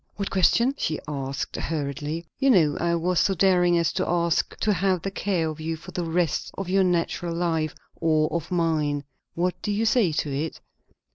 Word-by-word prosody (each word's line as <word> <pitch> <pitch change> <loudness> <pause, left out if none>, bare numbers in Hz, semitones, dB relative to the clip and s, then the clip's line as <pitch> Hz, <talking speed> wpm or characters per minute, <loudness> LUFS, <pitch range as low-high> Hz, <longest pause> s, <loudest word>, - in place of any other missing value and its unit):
"What 200 -1 -3
question?" 235 +7 +3
she 155 - -1
asked 135 -2 -4
hurriedly. 150 +1 -3
"You 270 0 +3
know, 160 - +4
I 170 0 +1
was 175 +1 +1
so 195 - +2
daring 180 -1 +4
as 170 -1 +1
to 185 - -1
ask 170 -1 0
to 215 - +3
have 185 -1 +1
the 195 - -2
care 190 -4 -1
of 155 0 -5
you 165 +1 -2
for 160 - -11
the 175 - -3
rest 165 -1 0
of 195 - -4
your 190 +1 +3
natural 175 -1 0
life 165 -3 -1 0.2
or 155 -2 +2
of 165 -2 -2
mine. 155 -5 0 0.3
What 180 +1 -1
do 210 - -2
you 210 +2 0
say 220 -6 +3
to 150 -2 -2
it?" 155 +3 -3
170 Hz, 195 wpm, -25 LUFS, 155-185 Hz, 0.3 s, know